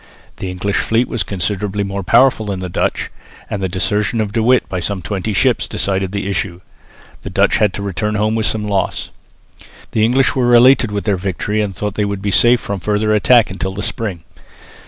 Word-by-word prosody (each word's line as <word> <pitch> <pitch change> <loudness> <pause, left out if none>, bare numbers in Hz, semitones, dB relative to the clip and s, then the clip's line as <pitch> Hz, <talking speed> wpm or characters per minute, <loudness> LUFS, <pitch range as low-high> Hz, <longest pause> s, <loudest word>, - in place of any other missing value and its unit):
The 95 - -5
English 90 +2 -2
fleet 115 +2 +1
was 120 - -3
considerably 100 +1 -2
more 100 0 -4
powerful 115 +2 +3
than 100 -2 -3
the 90 -1 -5
Dutch, - - -2 0.4
and 100 - -3
the 95 - -1
desertion 105 +5 0
of 105 -2 -2
De 115 - +1
With 125 +3 +3
by 90 - -3
some 95 +1 -3
twenty 100 +1 -3
ships 100 - +1
decided 95 -1 -1
the 100 -1 -3
issue. 95 -2 -3 0.6
The - - -7
Dutch - - +2
had 105 -2 +2
to 100 - -5
return 100 +2 -2
home 105 +1 +1
with 110 -1 0
some 105 -1 -2
loss. 100 -2 -2 0.8
The 110 - +1
English 125 +4 +3
were 120 -2 +3
elated 120 -1 +5
with 100 -1 -2
their 100 -3 0
victory 100 +3 -2
and 100 -3 -3
thought 105 -1 -3
that 105 - -2
they - - +2
would 100 -1 -4
be 100 - 0
safe 120 +5 +5
from 100 -1 -4
further 105 +4 0
attack 115 +1 +4
until 95 0 -4
the 105 - -4
spring. 95 -8 -4
105 Hz, 210 wpm, -17 LUFS, 95-110 Hz, 0.8 s, elated